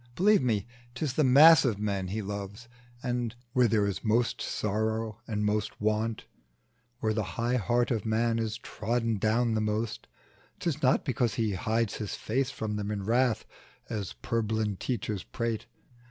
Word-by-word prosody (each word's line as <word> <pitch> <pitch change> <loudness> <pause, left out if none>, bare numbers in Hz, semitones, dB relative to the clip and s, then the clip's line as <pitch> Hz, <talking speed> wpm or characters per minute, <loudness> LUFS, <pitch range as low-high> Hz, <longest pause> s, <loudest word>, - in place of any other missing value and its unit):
Believe 190 -8 +4
it, 105 -4 0 0.3
'tis 135 0 -2
the 155 - +2
mass 150 +5 +8
of 120 -7 +1
men 100 -2 -2
He 105 +3 -3
loves; 100 +3 -6 0.4
And, 120 -2 -2 0.2
where 125 -1 +5
there 105 -2 +2
is 100 -2 -3
most 115 +2 +1
sorrow 110 +1 -1
and 105 -2 -1
most 105 0 -1
want, 110 +1 0 0.8
Where 110 -1 +1
the 110 - 0 0.2
high 120 +2 +1
heart 120 +3 +1
of 110 -4 0
man 115 +1 +1
is 110 -1 -2
trodden 115 -1 -2
down 115 +3 +2
The 110 - +1
most, 105 +1 -2 0.5
'tis 155 -4 -2
not 130 0 +3
because 120 -3 0
He 110 -3 0
hides 110 +2 0
his 105 -3 -4
face 130 +4 -1
From 110 -5 -3
them 105 0 -3
in 105 -2 -3
wrath, 120 +1 +2 0.5
as 105 -4 -3
purblind 110 -3 -1
teachers 105 -5 -2
prate. 115 -1 -3
110 Hz, 165 wpm, -29 LUFS, 105-120 Hz, 0.8 s, mass